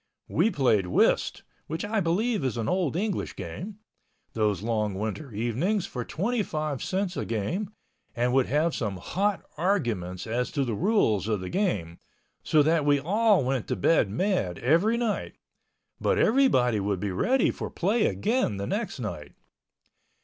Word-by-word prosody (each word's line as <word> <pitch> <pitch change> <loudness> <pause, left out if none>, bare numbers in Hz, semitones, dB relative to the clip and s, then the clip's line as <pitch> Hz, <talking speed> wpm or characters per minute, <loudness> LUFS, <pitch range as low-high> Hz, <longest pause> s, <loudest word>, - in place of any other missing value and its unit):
We - - +2
played 125 - +2
whist 90 - +2 0.2
(which 160 +5 -3
I 215 +1 0
believe 200 - 0
is 130 -3 -1
an 115 -2 -2
old 175 -3 0
English 200 +1 -2
game) 175 - -7 0.6
those 105 -4 0
long 105 -3 -1
winter 110 +8 -4
evenings 125 - 0
for 125 - -5
25 155 - -2
cents 190 -1 -2
a - - -2
game 115 - -2 0.5
and 125 +1 +1
would 135 -1 +3
have 155 +5 +1
some 105 -5 -2
hot 200 - -1 0.2
arguments 115 - -1
as 120 +2 -1
to 140 -3 0
the 120 - -2
rules 110 - +2
of 105 -3 0
the 90 - -5
game, 100 - -1 0.4
so 150 -1 +3
that 160 0 +2
we 145 0 +3
all 200 +2 +3
went 130 -2 -1
to - - -1
bed 105 - +3
mad 110 - 0
every 170 - +3
night—but 235 -3 -4
everybody 170 - +3
would 100 -1 -1
be 100 +1 -2
ready 245 - +2
for - - -5
play 210 +6 +1
again 220 - 0
the 100 - -3
next - - -3
night. - - -6
145 Hz, 155 wpm, -27 LUFS, -, 0.6 s, would